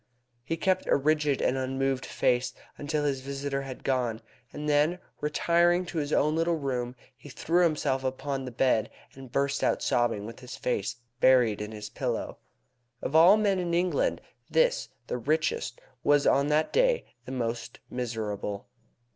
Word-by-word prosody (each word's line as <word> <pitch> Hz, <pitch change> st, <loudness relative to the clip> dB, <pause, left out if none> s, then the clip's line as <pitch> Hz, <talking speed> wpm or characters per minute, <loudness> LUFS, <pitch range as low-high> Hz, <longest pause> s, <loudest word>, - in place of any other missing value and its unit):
He 165 Hz, -, -2 dB
kept 185 Hz, +2 st, +1 dB
a -, -, +4 dB
rigid 150 Hz, -1 st, +1 dB
and 125 Hz, -, +2 dB
unmoved 135 Hz, 0 st, -1 dB
face 125 Hz, +1 st, +1 dB, 0.2 s
until 145 Hz, +1 st, -2 dB
his 135 Hz, -2 st, 0 dB
visitor 140 Hz, 0 st, -3 dB
had 135 Hz, -2 st, -8 dB
gone, 125 Hz, -4 st, 0 dB, 0.3 s
and 150 Hz, +1 st, -5 dB
then 150 Hz, +4 st, +3 dB, 0.2 s
retiring 170 Hz, +4 st, +2 dB
to 170 Hz, -2 st, -3 dB
his 145 Hz, 0 st, -3 dB
own 150 Hz, +1 st, +2 dB
little 165 Hz, +1 st, +2 dB
room, 125 Hz, -4 st, -3 dB, 0.2 s
he 130 Hz, +3 st, -13 dB
threw 170 Hz, +6 st, +1 dB
himself 145 Hz, -5 st, +1 dB
upon 135 Hz, +1 st, -2 dB
the 130 Hz, -, -5 dB
bed 120 Hz, -2 st, +2 dB, 0.2 s
and 135 Hz, -2 st, -12 dB
burst 140 Hz, +1 st, 0 dB
out -, -, +1 dB
sobbing 115 Hz, -4 st, +1 dB
with 115 Hz, -, -9 dB
his 125 Hz, 0 st, -8 dB
face 115 Hz, -2 st, -1 dB, 0.2 s
buried 125 Hz, -6 st, +4 dB
in 105 Hz, -, -4 dB
the 105 Hz, -1 st, -7 dB
pillow. -, -, -3 dB, 0.6 s
Of 145 Hz, -, -2 dB
all 175 Hz, +6 st, +8 dB
men 200 Hz, -3 st, +2 dB
in 170 Hz, -1 st, -1 dB
England, 180 Hz, +1 st, +1 dB, 0.3 s
this, -, -, +2 dB, 0.2 s
the 125 Hz, -, -3 dB
richest, 160 Hz, -, -1 dB, 0.2 s
was 145 Hz, 0 st, +4 dB
on 140 Hz, +1 st, +4 dB
that 150 Hz, +1 st, +1 dB
day -, -, +3 dB, 0.2 s
the -, -, -7 dB
most 120 Hz, -2 st, -3 dB
miserable. 110 Hz, -4 st, -3 dB
140 Hz, 165 wpm, -28 LUFS, 125-160 Hz, 0.6 s, all